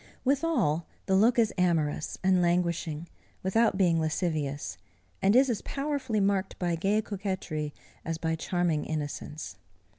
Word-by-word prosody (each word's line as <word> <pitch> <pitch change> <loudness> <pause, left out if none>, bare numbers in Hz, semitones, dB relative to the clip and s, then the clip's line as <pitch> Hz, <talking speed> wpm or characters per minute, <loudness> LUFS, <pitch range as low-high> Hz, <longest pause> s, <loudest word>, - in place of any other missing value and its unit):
Withal, 260 - +1 0.2
the 190 - +2
look 230 +5 +4
is 225 -2 +3
amorous 160 -4 +1
and 185 -1 +4
languishing, 170 -2 0 0.4
without 215 +2 +3
being 175 -4 +3
lascivious, 155 - -2 0.4
and 200 +3 +4
is 265 +2 +6
as 235 -5 -1
powerfully 275 -6 -2
marked 195 -1 +1
by 175 -2 0
gay 195 +6 +1
coquetry, 185 -7 -3 0.3
as 165 0 -3
by 160 0 -1
charming 165 -1 0
innocence. 150 -7 -5
180 Hz, 130 wpm, -29 LUFS, 160-210 Hz, 0.4 s, is